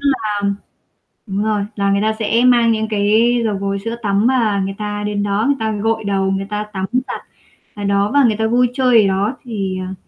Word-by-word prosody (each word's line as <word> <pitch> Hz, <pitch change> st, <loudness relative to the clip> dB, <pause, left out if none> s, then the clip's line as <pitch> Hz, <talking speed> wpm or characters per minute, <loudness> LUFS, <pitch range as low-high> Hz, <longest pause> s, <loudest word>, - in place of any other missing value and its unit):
là 225 Hz, -7 st, -1 dB, 0.8 s
đúng 200 Hz, 0 st, -2 dB
rồi, 215 Hz, -2 st, 0 dB
là 200 Hz, -1 st, +1 dB
người 200 Hz, -, +2 dB
ta 220 Hz, +1 st, +2 dB
sẽ 225 Hz, +1 st, +1 dB
mang 235 Hz, -2 st, +4 dB
những 220 Hz, 0 st, -1 dB
cái 220 Hz, +3 st, +2 dB
dầu 210 Hz, -3 st, 0 dB
gội, 200 Hz, 0 st, -2 dB
sữa 230 Hz, +1 st, -3 dB
tắm 200 Hz, +1 st, +1 dB
mà 225 Hz, -6 st, +2 dB
người 195 Hz, -, -4 dB
ta 210 Hz, -1 st, -4 dB
đến 205 Hz, -1 st, -1 dB
đó, 205 Hz, +1 st, 0 dB
người 280 Hz, 0 st, +2 dB
ta 220 Hz, -1 st, -1 dB
gội 220 Hz, +1 st, -1 dB
đầu, 195 Hz, -1 st, 0 dB
người 195 Hz, 0 st, -2 dB
ta 210 Hz, 0 st, -2 dB
tắm 190 Hz, -1 st, -3 dB
giặt 255 Hz, +1 st, -2 dB, 0.5 s
ở 205 Hz, -, -6 dB
đó 200 Hz, +1 st, +1 dB
và 285 Hz, -1 st, +5 dB
người 220 Hz, -3 st, +3 dB
ta 220 Hz, +1 st, 0 dB
vui 245 Hz, +2 st, +3 dB
chơi 250 Hz, -4 st, +4 dB
ở 200 Hz, -, +2 dB
đó 200 Hz, +6 st, 0 dB
thì, 195 Hz, -6 st, -3 dB
ờ 190 Hz, -, -6 dB
210 Hz, 225 wpm, -18 LUFS, 200-230 Hz, 0.8 s, và